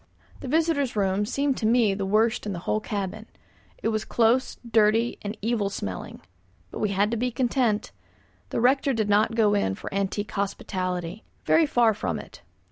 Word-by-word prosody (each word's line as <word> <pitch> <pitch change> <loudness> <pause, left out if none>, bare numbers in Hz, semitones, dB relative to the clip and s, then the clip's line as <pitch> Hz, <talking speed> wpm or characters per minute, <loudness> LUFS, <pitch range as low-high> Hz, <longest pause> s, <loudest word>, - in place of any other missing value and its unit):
The - - -7
visitors' 305 -3 +1
room 200 0 +1
seemed 280 +2 0
to 215 - 0
me 225 -3 +4
the 195 0 -3
worst 215 +2 +2
in 200 - -2
the - - -4
whole 215 - +1
cabin. 210 +1 -4 0.6
It - - +2
was 215 -1 -1
close, 240 +3 +2
dirty, 225 +1 +2
and 210 +2 -5
evil 220 -3 0
smelling. 95 - -6 0.5
But - - -6
we 210 - 0
had 200 +2 +1
to 235 - 0
be 250 +3 0
content. 240 -3 0 0.6
The - - -2
rector 270 +2 +3
did 215 -3 -1
not 210 +1 +4
to 225 - -7
go 215 -3 +3
in 95 - +1
for - - -8
antique 200 +1 -2
hospitality. 185 -2 -3 0.2
Very 320 -1 +4
far 235 -5 +3
from 210 - -3
it. - - -11
215 Hz, 185 wpm, -25 LUFS, 200-240 Hz, 0.6 s, me